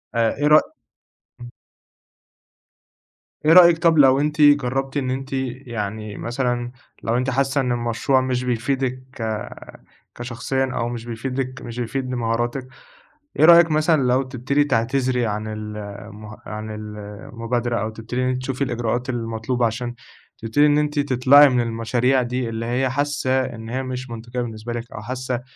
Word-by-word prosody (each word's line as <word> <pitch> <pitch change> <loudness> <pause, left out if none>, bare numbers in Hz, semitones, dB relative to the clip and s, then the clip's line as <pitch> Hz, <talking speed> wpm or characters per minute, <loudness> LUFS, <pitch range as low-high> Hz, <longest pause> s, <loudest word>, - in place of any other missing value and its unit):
آ، - - -1
آ 115 -1 +2
إيه 145 - +2
رأ 150 +1 +7 0.8
امم. 120 0 -9 2.0
إيه 155 - +6
رأيك 170 -1 +8
طب 165 -1 +3
لو 135 -2 +6
أنتِ 150 +1 0
جربتِ 135 -1 +3
إن 130 -2 -1
أنتِ 135 +1 -5
يعني 115 -5 -4
مثلًا 120 0 -2 0.3
لو 115 +1 0
أنتِ 130 +1 0
حاسّة 135 +1 +1
إن 125 -2 -1
المشروع 120 +3 +1
مش 130 -1 -1
بيفيدِك 125 +1 -1 0.2
ك 110 -3 -3 0.7
كشخصيًا 130 +2 -2
أو 115 - -1
مش 120 -1 -6
بيفيدِك 130 +2 -4
مش 120 +1 -7
بيفيد 130 +2 -3
بمهاراتك، 120 +1 -2 0.7
إيه 155 - +7
رأيك 170 0 +7
مثلًا 155 0 +3
لو 125 +1 +3
تبتدي 130 +2 0
تعتذري 125 -1 0
عن 105 0 -3
المه 105 0 -8
عن 110 0 -6
ال 105 0 -7 0.4
المبادرة؟ 120 0 -1
أو 110 - -2
تبتدي 115 +3 -5
إن - - +1
انتِ 130 0 -2
تشوفي 130 +1 -2
الإجراءات 120 0 -2
المطلوبة 115 0 -1
عشان 120 +2 -2 0.4
تبتدي 115 +6 +2
إن 145 0 +4
أنتِ 150 0 0
تطلعي 140 +1 +6
من 125 -2 +2
المشاريع 120 +3 +1
دي، 125 0 -2
اللي 115 0 -4
هي 125 +3 0
حاسّة 130 -1 0
إن 115 -3 -8
هي 130 +3 -2
مش 130 0 -5
منطقية 120 +2 -5
بالنسبة 115 0 -5
لِك 120 0 -6
أو - - -7
حاسّة 125 +1 -4
125 Hz, 155 wpm, -22 LUFS, 115-135 Hz, 2.0 s, رأيك